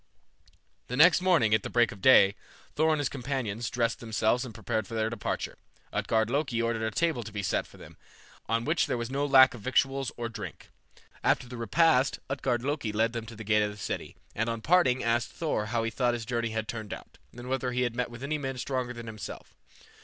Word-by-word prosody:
The 125 Hz, -, -4 dB
next 175 Hz, +4 st, +7 dB
morning, 170 Hz, -13 st, +3 dB
at 110 Hz, -, +1 dB
break 120 Hz, -1 st, +3 dB
of 100 Hz, -, -11 dB
day, 100 Hz, -5 st, +7 dB, 0.4 s
Thor 160 Hz, +1 st, +2 dB
and 155 Hz, -, +3 dB
his 145 Hz, -, +1 dB
companions 120 Hz, -5 st, -3 dB
dressed 115 Hz, -1 st, 0 dB
themselves 110 Hz, +2 st, +1 dB
and 125 Hz, -, -7 dB
prepared 110 Hz, 0 st, -3 dB
for 115 Hz, -, -6 dB
their 110 Hz, 0 st, 0 dB
departure. 115 Hz, -3 st, -4 dB, 0.3 s
Utgard 110 Hz, -1 st, +1 dB
Loki 130 Hz, -1 st, -1 dB
ordered 115 Hz, -1 st, 0 dB
a 110 Hz, -, 0 dB
table 160 Hz, 0 st, 0 dB
to 110 Hz, -1 st, -8 dB
be 100 Hz, -1 st, -4 dB
set 90 Hz, -, 0 dB
for -, -, -17 dB
them, -, -, -13 dB, 0.5 s
on 115 Hz, +1 st, +1 dB
which 160 Hz, +2 st, +1 dB
there -, -, -1 dB
was 120 Hz, +1 st, -4 dB
no 140 Hz, +1 st, 0 dB
lack 130 Hz, -3 st, +7 dB
of 120 Hz, -, -10 dB
victuals 135 Hz, +2 st, +1 dB
or 120 Hz, -1 st, -2 dB
drink. 110 Hz, -3 st, -8 dB, 0.5 s
After -, -, +2 dB
the 125 Hz, -, -8 dB
repast 130 Hz, +4 st, +3 dB
Utgard 125 Hz, -3 st, -1 dB
Loki 140 Hz, -5 st, -1 dB
led 110 Hz, +2 st, +1 dB
them 115 Hz, -1 st, -5 dB
to 115 Hz, -, -9 dB
the 110 Hz, -, -8 dB
gate 105 Hz, 0 st, +3 dB
of 105 Hz, -, +1 dB
the 105 Hz, -, -9 dB
city, 100 Hz, -, -5 dB, 0.2 s
and 115 Hz, +2 st, -1 dB
on 115 Hz, -1 st, -3 dB
parting 145 Hz, -4 st, +3 dB
asked 115 Hz, 0 st, 0 dB
Thor 150 Hz, -10 st, -1 dB
how 115 Hz, 0 st, 0 dB
he 115 Hz, -, -1 dB
thought 120 Hz, 0 st, +1 dB
his 115 Hz, -2 st, -5 dB
journey 115 Hz, -1 st, -1 dB
had 110 Hz, 0 st, -3 dB
turned 110 Hz, -3 st, -5 dB
out, -, -, -15 dB
and 120 Hz, +1 st, -10 dB
whether 130 Hz, -1 st, -1 dB
he 125 Hz, 0 st, 0 dB
had 120 Hz, -1 st, -2 dB
met 125 Hz, 0 st, -1 dB
with 120 Hz, +2 st, -10 dB
any 150 Hz, +2 st, -1 dB
men 135 Hz, -2 st, -4 dB
stronger 125 Hz, -1 st, -2 dB
than 120 Hz, -1 st, -8 dB
himself. 110 Hz, -2 st, -8 dB
120 Hz, 225 wpm, -28 LUFS, 110-130 Hz, 0.5 s, next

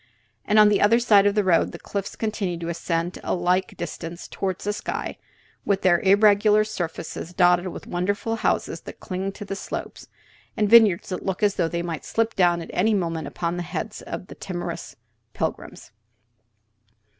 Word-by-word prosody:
And 210 Hz, -, +2 dB
on 210 Hz, -1 st, +8 dB
the 205 Hz, -, +2 dB
other 220 Hz, +3 st, +5 dB
side 210 Hz, -4 st, +5 dB
of 205 Hz, -, +1 dB
the 210 Hz, -, +3 dB
road 180 Hz, -3 st, +2 dB
the -, -, -6 dB
cliffs 200 Hz, -1 st, -5 dB
continue 210 Hz, -5 st, -2 dB
to 165 Hz, 0 st, -5 dB
ascend 170 Hz, +1 st, -2 dB
a -, -, 0 dB
like 180 Hz, +1 st, 0 dB
distance 170 Hz, +1 st, -6 dB
toward 190 Hz, -2 st, -3 dB
the 205 Hz, +2 st, -3 dB
sky, -, -, -4 dB, 0.4 s
their 190 Hz, -3 st, +3 dB
irregular 205 Hz, +1 st, +5 dB
surfaces 175 Hz, -4 st, -5 dB
dotted 180 Hz, 0 st, +4 dB
with 180 Hz, -, -7 dB
wonderful 200 Hz, +5 st, -2 dB
houses -, -, -1 dB
that -, -, -11 dB
cling 190 Hz, +1 st, -4 dB
to 205 Hz, -, -8 dB
the 195 Hz, -, -4 dB
slopes, -, -, -6 dB, 0.5 s
and 210 Hz, -2 st, +2 dB
vineyards 210 Hz, -4 st, +6 dB
that 185 Hz, -, -4 dB
look 190 Hz, +1 st, -3 dB
as 205 Hz, -1 st, +4 dB
though 170 Hz, -, 0 dB
they 170 Hz, 0 st, -2 dB
might 165 Hz, -2 st, -4 dB
slip 225 Hz, 0 st, 0 dB
down 175 Hz, -2 st, +3 dB
at -, -, -10 dB
any 215 Hz, +4 st, +2 dB
moment 165 Hz, -5 st, -2 dB
upon 170 Hz, 0 st, -3 dB
the -, -, -2 dB
heads 210 Hz, +5 st, -5 dB
of -, -, -6 dB
timorous 175 Hz, -2 st, -5 dB, 0.4 s
pilgrims. -, -, -4 dB
190 Hz, 175 wpm, -24 LUFS, 175-210 Hz, 0.5 s, on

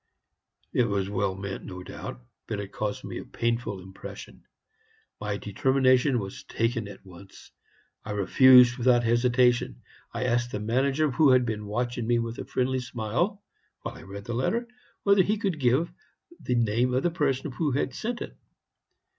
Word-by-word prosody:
"It 125 Hz, -, +3 dB
was 100 Hz, -2 st, -1 dB
well 95 Hz, -2 st, 0 dB
meant, 95 Hz, 0 st, -6 dB
no 90 Hz, -1 st, -8 dB
doubt, -, -, -8 dB, 0.2 s
but 105 Hz, -, -3 dB
it 100 Hz, -1 st, -6 dB
caused 105 Hz, -1 st, -3 dB
me -, -, -5 dB
a -, -, -7 dB
painful 115 Hz, -4 st, -2 dB
impression. 95 Hz, +1 st, -10 dB, 0.8 s
My 105 Hz, -1 st, -2 dB
determination 130 Hz, +5 st, +2 dB
was 120 Hz, +6 st, -5 dB
taken 115 Hz, -2 st, -1 dB
at 100 Hz, -, -12 dB
once. 95 Hz, +1 st, -14 dB, 0.5 s
I 105 Hz, -, -5 dB
refused 125 Hz, +4 st, +6 dB
without 120 Hz, 0 st, +4 dB
hesitation. 120 Hz, +1 st, +2 dB, 0.3 s
I 120 Hz, +2 st, -3 dB
asked 120 Hz, -1 st, 0 dB
the 105 Hz, -, -2 dB
manager, 135 Hz, +7 st, +1 dB
who 140 Hz, +3 st, +4 dB
had 130 Hz, -1 st, +5 dB
been 105 Hz, -2 st, -3 dB
watching 120 Hz, +2 st, -2 dB
me 120 Hz, 0 st, +3 dB
with 115 Hz, 0 st, -3 dB
a -, -, -5 dB
friendly 130 Hz, +1 st, 0 dB
smile 125 Hz, -, -2 dB, 0.4 s
while -, -, -4 dB
I -, -, -12 dB
read 100 Hz, +1 st, -9 dB
the 120 Hz, -, -4 dB
letter, 225 Hz, -, 0 dB, 0.4 s
whether 200 Hz, -1 st, +5 dB
he 210 Hz, +3 st, +1 dB
could 195 Hz, -7 st, -2 dB
give 135 Hz, +7 st, +2 dB, 0.5 s
the 125 Hz, -, -1 dB
name 120 Hz, +2 st, +1 dB
of 130 Hz, -, +1 dB
the 175 Hz, -, +2 dB
person 145 Hz, -4 st, -1 dB
who 145 Hz, +1 st, -1 dB
had 135 Hz, -1 st, -1 dB
sent 235 Hz, -, -3 dB
it. -, -, -10 dB
120 Hz, 170 wpm, -27 LUFS, 105-130 Hz, 0.8 s, refused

